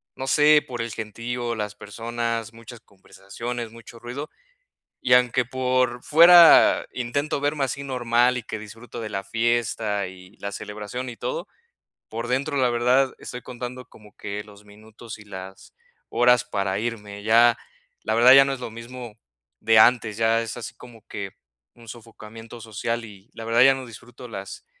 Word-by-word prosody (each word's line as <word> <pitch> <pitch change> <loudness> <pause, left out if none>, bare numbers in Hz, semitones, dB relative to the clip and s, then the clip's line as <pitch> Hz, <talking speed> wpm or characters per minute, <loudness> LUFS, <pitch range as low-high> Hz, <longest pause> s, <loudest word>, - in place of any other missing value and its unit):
no 130 - -5
sé, 150 +2 +5
por 120 -2 -5
el 115 -1 -4
gentío, 120 +2 -4
las 105 -2 -4
personas, 115 +1 -4
muchas 115 +1 -12
conversaciones, 110 +4 -8
mucho 115 0 -13
ruido. 125 +6 -6 0.8
Y 125 - +4
aunque 125 0 +3
por 125 -1 0
fuera 170 +3 +7
intento 140 +4 -2
verme 145 0 0
así 135 +1 -4
normal 125 -2 +1
y 125 - -3
que 110 - -6
disfruto 115 +3 -10
de 110 - -5
la 100 -1 -4
fiesta, 115 -2 -1
y 90 +2 -15
la 100 -2 -6
celebración 105 +6 -6
y 120 - -8
todo, - - -4 0.6
por 115 +2 -5
dentro, 140 +4 -1
la 125 -2 +2
verdad, 125 +3 +2
estoy 125 - -8
contando 125 +1 -7
como 105 -2 -19
que 105 0 -5
los 105 0 -17
minutos 110 +2 -12
y 105 - -14
las 95 -1 -10 0.4
horas 125 0 +4
para 100 -5 -2
irme. 105 -3 -5
Ya, 115 +2 +5 0.5
la 110 - 0
verdad, 120 +3 +7
ya 135 0 +8
no 135 - -1
es 135 - -6
lo 125 - -6
mismo 115 0 -9 0.4
de 115 -1 +3
antes, 110 -2 +4
ya 115 0 +2
es 115 +1 -6
así 120 -2 -7
como 115 -3 -15
que 100 -1 -6 0.4
un 115 -1 -17
sofocamiento 115 0 -11
social. 115 +1 -4
Y 100 -1 -15
la 115 - -8
verdad, 115 +1 +3
ya 135 +1 +7
no 130 -1 -7
disfruto 125 +2 -12
las 100 - -8
115 Hz, 170 wpm, -24 LUFS, 110-125 Hz, 0.8 s, ya